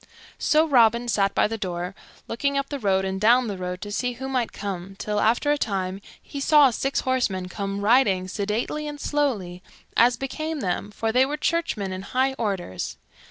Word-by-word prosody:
So 310 +1 +3
Robin 235 -3 +4
sat 200 -4 +1
by - - +4
the 225 +1 -5
door, 180 -1 -3 0.3
looking 280 +4 -1
up 275 0 -1
the 285 - -4
road 190 -4 +1
and 190 0 -3
down 240 +4 +5
the 205 - -3
road 180 0 -4
to 205 - -6
see 245 +4 -1
who 265 +2 -6
might 255 -3 -1
come, 195 -1 -6
till, 210 0 -2
after 235 +7 +2
a 295 - +1
time, 190 -3 -2 0.2
he 280 - -8
saw 290 -1 +6
six 270 +4 -1
horsemen 225 -8 0
come 200 +1 -4
riding 205 -4 +3
sedately 215 +10 -2
and 295 0 -6
slowly, 215 -14 -1 0.3
as 240 0 +5
became 310 +4 -4
them, 185 +2 -2
for 225 +2 -2
they 250 +3 +4
were 290 +3 -2
churchmen 270 - -1
in 185 - -5
high 260 +6 0
orders. 190 - -3
225 Hz, 190 wpm, -24 LUFS, 195-270 Hz, 0.3 s, saw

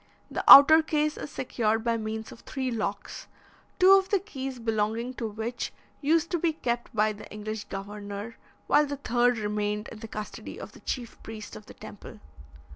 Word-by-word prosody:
The - - -3
outer 315 +3 +11
case 305 -1 0
is - - -7
secured 225 -5 -1
by 230 -1 +1
means 220 0 -5
of - - -12
three 260 -1 -4
locks, 205 -3 -4 0.5
two 375 +1 +6
of 385 -1 +5
the 400 - +3
keys 270 -9 -6
belonging 225 +1 -1
to 235 -3 -4
which 225 +3 -4 0.3
used 320 +3 +2
to 345 - 0
be 325 0 +1
kept 240 -6 -3
by 215 0 +2
the 205 - -12
English 210 0 -6
governor, 205 +2 -7 0.3
while 295 - +4
the 285 0 -4
third 245 -2 +1
remained 210 0 -2
in 220 - -10
the 225 - -8
custody 215 -1 -7
of - - -8
the - - -15
chief 240 -3 -5
priest 215 - -9
of 110 - -12
the - - -12
temple. - - -11
230 Hz, 185 wpm, -27 LUFS, 215-275 Hz, 0.5 s, outer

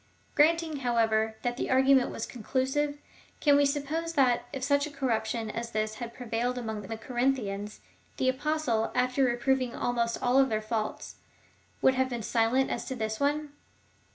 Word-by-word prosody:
Granting, 320 0 +3
however, 225 -3 +1
that 240 0 -1
the - - -2
argument 265 0 +4
was 225 - -4
conclusive, 270 +5 -1 0.4
can 290 -2 +5
we 285 0 +5
suppose 305 +4 -2
that, 245 -4 +2
if 270 -2 -5
such 285 +1 +2
a - - -7
corruption 230 -5 -2
as 230 +1 -4
this 215 0 -1
had 235 0 -7
prevailed 245 +1 -2
among 220 -3 -4
the 220 +3 -6
Corinthians, 225 -4 -2 0.4
the 260 - 0
Apostle, 260 -4 0
after 255 +2 +2
reproving 255 0 +1
almost 235 -1 0
all 255 +2 +4
their 220 -5 0
faults, 215 0 -4 0.7
would 265 - +6
have 260 0 +1
been 240 -3 -4
silent 235 +5 +2
as - - -3
to 260 - -4
this 220 -2 -3
one 290 +1 0
250 Hz, 160 wpm, -29 LUFS, 225-275 Hz, 0.7 s, would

